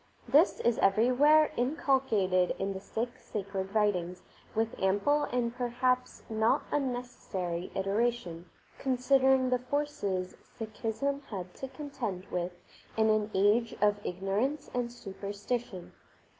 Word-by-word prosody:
This 290 +9 +4
is 235 -1 +2
everywhere 255 +10 +5
inculcated 240 - +2
in 195 +1 -2
the 190 - -5
Sikh 235 +5 -4
sacred 195 -1 -5
writings 185 -4 +1 0.3
with 225 +1 0
ample 205 +11 +2
and 240 -2 -1
perhaps 250 +1 0
not 220 0 +2
unnecessary 245 -10 -3
iteration, 195 -4 -1 0.3
considering 265 0 +3
the 250 - +3
forces 250 -9 -2 0.3
Sikhism 225 +5 -2
had 185 -4 -6
to 265 - -6
contend 250 - -5
with 180 0 -1 0.5
in 220 0 +4
an 215 0 +1
age 210 +4 +3
of 205 0 +2
ignorance 200 +11 -1
and 245 -1 -1
superstition. 205 -2 -5
225 Hz, 115 wpm, -30 LUFS, 195-255 Hz, 0.5 s, everywhere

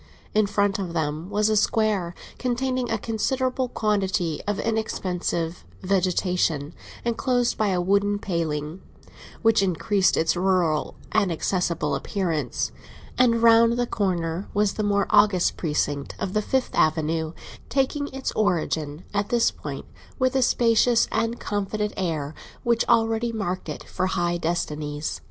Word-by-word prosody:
In 215 -1 +3
front 200 0 +1
of 180 -4 -4
them 160 +1 -2
was 210 +1 +1
the 215 - +2
Square, 210 -4 +1 0.2
containing 255 0 -1
a 225 - +1
considerable 255 +4 -1
quantity 190 -8 0
of 205 -1 0
inexpensive 180 -6 -2 0.2
vegetation, 180 -5 0 0.3
enclosed 245 +1 +1
by 215 - +1
a 185 -2 +1
wooden 200 +3 +2
paling, 165 -3 -3 0.6
which 225 -2 +5
increased 195 +1 +2
its 160 +2 +2
rural 175 -4 +1 0.2
and 210 -4 +2
accessible 170 -3 -1
appearance; 160 - -2 0.4
and 235 -2 +3
round 230 0 +6
the 245 0 0
corner 180 -4 -2
was 205 -1 +2
the - - -3
more 200 -1 +2
august 205 -4 +4
precinct 145 -3 -2
of 190 - -3
the 215 - +2
Fifth 260 +4 -1
Avenue, 160 +1 +1 0.4
taking 285 +1 0
its 270 -1 -4
origin 160 -6 -1
at 205 0 0
this 235 -1 +3
point - - -7 0.3
with 255 -1 +1
a 265 - +3
spacious 235 -1 +3
and 230 +1 -1
confident 210 +1 -2
air 160 -5 -2 0.3
which 235 -1 +2
already 225 0 +2
marked 195 -5 -3
it - - -6
for 185 - -2
high 175 -1 0
destinies. 150 -3 -3
200 Hz, 140 wpm, -24 LUFS, 170-225 Hz, 0.6 s, round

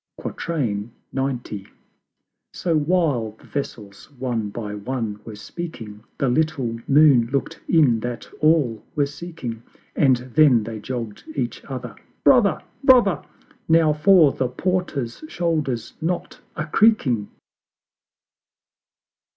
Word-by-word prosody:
XC. 115 -11 -3 1.7
So 170 -3 -1
while 150 -8 +1
the - - -22
Vessels 105 -8 -6
one 120 -4 -2
by 105 0 -5
one 105 0 -4
were 110 - -8
speaking, 110 -5 -8
The 135 - +1
little 125 -4 0
Moon 140 -5 +5
look'd 140 - -2
in 140 -9 +4
that 120 +1 -5
all 150 -8 +2
were 145 -2 +3
seeking: 145 -6 -7 0.3
And 135 -3 +5 0.2
then 140 -8 +5
they 110 0 -6
jogg'd 115 -2 -6
each - - -3
other, - - -6 0.3
"Brother! - - +4 0.2
Brother! 240 - +5 0.5
Now 160 -2 +5
for 155 -1 +6
the 130 - -1
Porter's 155 - -2
shoulders' 155 - -2
knot 175 +2 -3
a 155 - -3
creaking!" 150 - +3
135 Hz, 110 wpm, -22 LUFS, 115-160 Hz, 1.7 s, for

